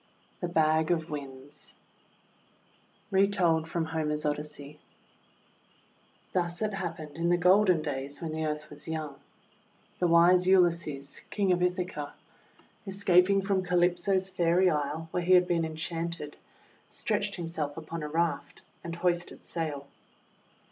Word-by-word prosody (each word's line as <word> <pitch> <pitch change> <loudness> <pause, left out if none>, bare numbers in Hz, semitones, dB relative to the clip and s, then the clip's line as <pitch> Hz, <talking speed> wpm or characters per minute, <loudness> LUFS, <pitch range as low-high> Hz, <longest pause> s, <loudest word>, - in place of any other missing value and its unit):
THE 175 - -2
BAG 160 -1 +2
OF 165 -2 0
WINDS 140 0 -8 1.4
Retold 190 -5 +3
from 165 0 -1
Homer's 155 -1 -2
Odyssey 150 0 -4 1.5
THUS 175 +1 0
it 215 -1 -1
happened 160 -5 -5
in 170 +1 0
the 175 - +4
golden 180 -2 +4
days 140 -1 -4
when 165 -2 -4
the 160 0 -3
Earth 150 0 -4
was 150 +1 -11
young: 155 -3 -4 0.4
— - - -35
The 180 - +3
wise 175 +2 +5
Ulysses, 170 -7 +2
King 200 -3 +1
of 180 0 +2
Ithaca, 180 -5 -2 0.7
escaping 195 0 +3
from 195 -1 +1
Calypso's 180 +1 +2
Fairy 180 0 +3
Isle, 150 +2 -2
where 180 - -1
he 180 +2 +3
had 180 0 +6
been 170 -2 +1
enchanted, 160 -1 -4 0.5
stretched 205 -2 -2
himself 165 -4 -4
upon 165 +1 -6
a 150 - -3
raft, 170 +2 -2 0.2
and 170 0 -5
hoisted 175 0 -1
sail. 150 -4 -3
170 Hz, 130 wpm, -29 LUFS, 150-180 Hz, 1.5 s, had